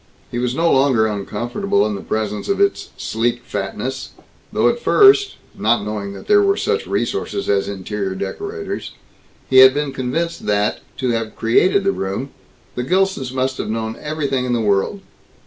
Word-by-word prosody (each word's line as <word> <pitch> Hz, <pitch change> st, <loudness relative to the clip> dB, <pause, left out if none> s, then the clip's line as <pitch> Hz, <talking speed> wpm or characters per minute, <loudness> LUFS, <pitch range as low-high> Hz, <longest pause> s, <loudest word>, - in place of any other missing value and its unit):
He 120 Hz, -, -2 dB
was 125 Hz, 0 st, -1 dB
no 165 Hz, +2 st, +2 dB
longer 130 Hz, -5 st, +4 dB
uncomfortable 120 Hz, -, -1 dB
in 105 Hz, -, -1 dB
the 100 Hz, -, -5 dB
presence 105 Hz, -1 st, -3 dB
of 200 Hz, -, +1 dB
its 200 Hz, 0 st, +1 dB
sleek 120 Hz, +2 st, -1 dB
fatness, 105 Hz, +7 st, -4 dB, 0.4 s
though -, -, +2 dB
at 480 Hz, -, +1 dB
first 405 Hz, -2 st, +5 dB, 0.2 s
(not 110 Hz, 0 st, +1 dB
knowing 105 Hz, -2 st, -4 dB
that -, -, -10 dB
there 415 Hz, -1 st, +5 dB
were 395 Hz, 0 st, +2 dB
such 450 Hz, 0 st, -1 dB
resources 300 Hz, -, -2 dB
as 100 Hz, -1 st, +1 dB
interior 100 Hz, 0 st, -4 dB
decorators), 410 Hz, -, -5 dB, 0.5 s
he 130 Hz, -, +3 dB
had 130 Hz, +1 st, +9 dB
been 145 Hz, -2 st, -1 dB
convinced 155 Hz, +7 st, -3 dB
that, 105 Hz, 0 st, +1 dB, 0.2 s
to 130 Hz, -, -1 dB
have 115 Hz, -1 st, -2 dB
created 185 Hz, +12 st, +3 dB
the 195 Hz, -, +2 dB
room, 100 Hz, -, -4 dB, 0.4 s
the -, -, -3 dB
Gilsons 185 Hz, -3 st, 0 dB
must 130 Hz, 0 st, -1 dB
have -, -, -3 dB
known 110 Hz, 0 st, -3 dB
everything 145 Hz, -4 st, -1 dB
in 125 Hz, -1 st, -1 dB
the 120 Hz, -, +1 dB
world. 105 Hz, -, 0 dB
125 Hz, 170 wpm, -19 LUFS, -, 0.5 s, had